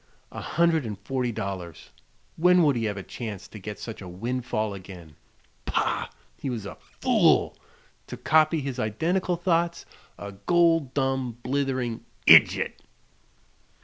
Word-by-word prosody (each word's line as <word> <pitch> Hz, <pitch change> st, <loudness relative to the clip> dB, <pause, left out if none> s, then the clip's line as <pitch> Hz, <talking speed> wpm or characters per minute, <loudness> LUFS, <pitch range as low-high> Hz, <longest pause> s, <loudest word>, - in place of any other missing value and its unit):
A -, -, -7 dB
hundred 165 Hz, -2 st, +2 dB
and 105 Hz, -4 st, -5 dB
forty 125 Hz, 0 st, -2 dB
dollars; 95 Hz, -6 st, -6 dB, 0.4 s
When 180 Hz, +1 st, +5 dB
would 145 Hz, -4 st, +3 dB
he 115 Hz, -1 st, -1 dB
have 105 Hz, -2 st, -2 dB
a 95 Hz, -, -5 dB
chance 110 Hz, -4 st, -7 dB
to 105 Hz, -, -11 dB
get 105 Hz, +1 st, -7 dB
such 115 Hz, -3 st, -8 dB
a 95 Hz, -, -8 dB
windfall 110 Hz, +2 st, -2 dB
again? 90 Hz, -5 st, -11 dB, 0.5 s
Pah! -, -, 0 dB, 0.3 s
he -, -, -3 dB
was 115 Hz, -5 st, -4 dB
a 100 Hz, -, -6 dB
fool -, -, +2 dB, 0.5 s
to -, -, -7 dB
copy 155 Hz, +1 st, +3 dB
his 135 Hz, -2 st, -4 dB
identical 170 Hz, -, 0 dB
thoughts: 170 Hz, -1 st, 0 dB, 0.3 s
"a 100 Hz, -, -7 dB
gol 165 Hz, -, +3 dB, 0.2 s
dum 135 Hz, -3 st, -1 dB
blithering 130 Hz, -3 st, -1 dB, 0.2 s
idjit!" -, -, +6 dB
125 Hz, 140 wpm, -26 LUFS, 105-160 Hz, 0.5 s, idjit